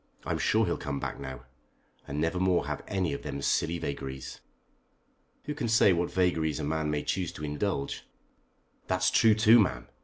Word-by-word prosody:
I'm - - -1
sure - - +3
he'll - - -1
come 70 -1 -4
back - - -5
now, 65 -2 -7 0.7
and 70 +1 -4
never 85 +3 0
more 90 -1 +2
have - - -4
any 95 -6 -1
of 70 - -5
them 70 -2 -5
silly 80 +4 +1
vagaries." 65 -4 -6 1.0
"Who 150 - -4
can 145 -5 -3
say 110 -4 +5
what 85 0 0
vagaries 80 -4 +1
a - - -3
man 80 +1 -1
may 75 -1 -1
choose 90 -1 -1
to 75 - -6
indulge?" 75 0 -3 0.8
"That's 90 -1 +2
true 110 +2 +5
too, 110 +2 +6
ma'am. 65 - 0
80 Hz, 180 wpm, -29 LUFS, 70-95 Hz, 1.0 s, too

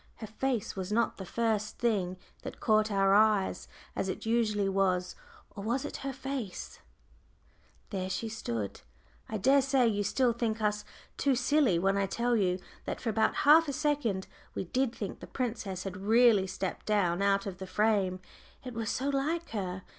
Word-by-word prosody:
Her 220 - -7
face 225 +1 -2
was 190 0 -4
not 235 +2 +1
the 190 - -7
first 220 -1 -1
thing 195 -6 0 0.2
that - - -8
caught 215 -1 +3
our 195 -1 +3
eyes, 210 -2 +3 0.3
as 190 - -1
it - - -4
usually 220 -3 +1
was; 190 -2 +1 0.4
or 200 - -8
was 250 +6 -1
it - - -5
her 275 - -4
face? 265 -6 -5 1.1
I 185 -1 -2 1.3
dare 270 +7 +4
say 265 -2 +3
you 205 -2 +1
will 250 -3 +4
think 230 -1 -1
us 210 -1 0 0.3
too 275 -2 +2
silly 255 - +3
when 195 +3 +2
I 200 0 +1
tell 240 +4 0
you 185 -4 +2 0.3
that - - -3
for 230 - -1
about 220 +1 +2
half 315 +3 +7
a 280 - -2
second 275 -10 0 0.3
we - - -2
did 255 +7 0
think 200 - -5
the - - -10
princess 215 -7 -3
had 195 -1 -5
really 215 0 +4
stepped 190 0 -4
down 195 -4 +2
out 200 0 +2
of 190 -3 -6
the 190 - -6
frame. 195 -3 +1 0.4
It 250 - -6
was 225 -2 -3
so 265 +6 -1
like 310 +5 -1
her. 185 -4 -3
215 Hz, 170 wpm, -30 LUFS, 195-245 Hz, 1.3 s, half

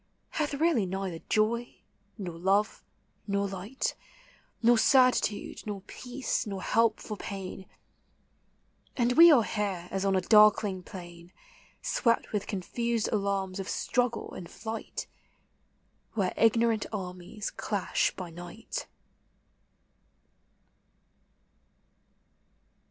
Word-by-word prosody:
Hath 295 -2 -1
really 280 - +2
neither 190 -2 -3
joy, 230 +3 +1 0.4
nor 180 -5 -5
love, 195 +5 +1 0.4
nor 200 0 0
light, 195 +7 -3 0.7
Nor 240 +1 +6
certitude, 255 -6 +3
nor 205 -2 -4
peace, 245 +4 -3
nor 195 -2 -4
help 230 -1 +2
for 215 - -6
pain; 190 -1 -7 1.3
And 240 -1 +3
we 335 +4 +9
are 255 -7 +6
here 200 -5 -2
as 195 0 -1
on 195 -1 +2
a 185 - +2
darkling 210 -3 +5
plain 175 -1 -11 0.5
Swept 230 -2 +1
with 205 -2 -2
cod 190 -4 -4
fused 235 -2 -1
alarms 195 -2 -1
of 195 - -4
struggle 245 -2 -1
and 170 -2 -8
flight, 220 +3 -5 1.1
Where 195 -5 0
ignorant 225 -1 +3
armies 185 +1 -5
clash 205 -3 0
by 180 -3 -7
night. 175 - -7
205 Hz, 105 wpm, -29 LUFS, 190-230 Hz, 1.3 s, we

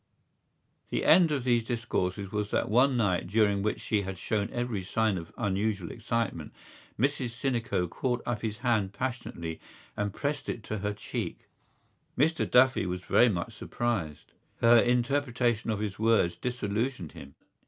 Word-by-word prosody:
The - - -1
end 170 -1 +6
of 140 -4 0
these 120 -2 +2
discourses 100 -5 -2
was 105 -1 -2
that - - 0
one 130 +3 +4
night 95 -6 +1
during 100 0 +2
which 105 +1 -1
she 105 -2 0
had 95 -1 -5
shown 100 +3 -1
every 120 -5 -2
sign 110 +2 +1
of 85 -2 -6
unusual 100 -3 -1
excitement, 115 -9 -3 0.4
Mrs 125 -2 0
Sinico 120 -9 0
caught 120 +7 -2
up 120 -3 -2
his 110 -1 -3
hand 105 -5 +2
passionately 100 -9 -4 0.4
and 105 0 -1
pressed 140 +4 -3
it 110 - -4
to 110 - -4
her 105 +1 -2
cheek. 105 - -5 0.8
Mr 160 +5 +2
Duffy 125 -5 +4
was 90 0 -3
very 120 +6 +4
much 100 +3 -3
surprised. 110 -9 -3 0.3
Her 115 0 +7
interpretation 120 -1 +1
of 110 - +1
his 105 -2 -4
words 110 -6 +3
disillusioned 115 - -2
him. 70 0 -12
110 Hz, 155 wpm, -29 LUFS, 100-120 Hz, 0.8 s, Her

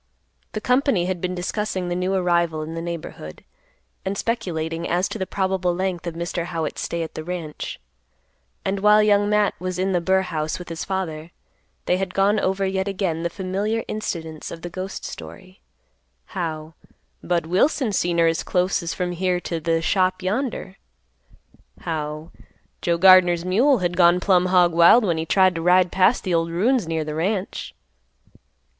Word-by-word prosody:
The 215 - -3
company 250 -7 +2
had 180 -2 -3
been 180 0 -2
discussing 185 0 -2
the 175 - -2
new 185 +2 0
arrival 170 -4 +1
in 160 +1 -6
the 165 - -4
neighborhood, 165 - -7 0.6
and 195 +1 -3
speculating 170 -8 -2
as 180 +2 +1
to 220 - -5
the 190 - -2
probable 190 -2 0
length 185 -1 -2
of 170 - -4
Mr. 170 0 -3
Howitt's 165 -3 -3
stay 170 0 -2
at 160 - -7
the 155 - -6
ranch, 165 -3 -6 0.9
and 195 +1 -1
while 210 +1 +5
Young 205 -1 +3
Matt 210 -1 +2
was 185 -1 -4
in 190 +1 0
the 175 -2 +1
burr 190 +2 +2
house 155 -3 -3
with 180 - -9
his 165 -1 -4
father, 170 -5 -4 0.6
they 180 - +2
had 190 -1 -4
gone 200 +2 +3
over 195 +1 0
yet 190 0 -1
again 185 -5 -2
the 170 - -1
familiar 200 +5 -2
incidents 160 -7 -5
of 165 - -9
the 175 - -6
ghost 185 +2 -6
story; 185 0 -10 0.7
how 160 -3 -4 0.5
"Budd 170 -2 0
Wilson 220 - +1
seen 175 -3 0
her 170 - +4
as 165 0 +1
close 185 +1 0
as 170 -1 -4
from 180 -1 -2
here 180 0 0
t' 170 -1 -4
th' 165 0 0
shop 185 0 +1
yonder." 200 -1 -3 1.0
How 155 -2 -4 0.5
"Joe 170 -1 +1
Gardner's 180 -1 +6
mule 245 +10 +3
had 175 -3 -1
gone 175 0 +5
plumb 185 -1 +3
hog 180 -2 +4
wild 170 +8 +6
when 170 -4 0
he 160 - -3
tried 185 0 +4
to 165 - -4
ride 180 +1 +4
past 190 +6 +3
the 185 - -1
ol' 165 0 +1
ruins 210 +4 +1
near 160 -1 -2
th' 150 - -4
ranch." 185 +5 -3
180 Hz, 175 wpm, -23 LUFS, 170-190 Hz, 1.0 s, Gardner's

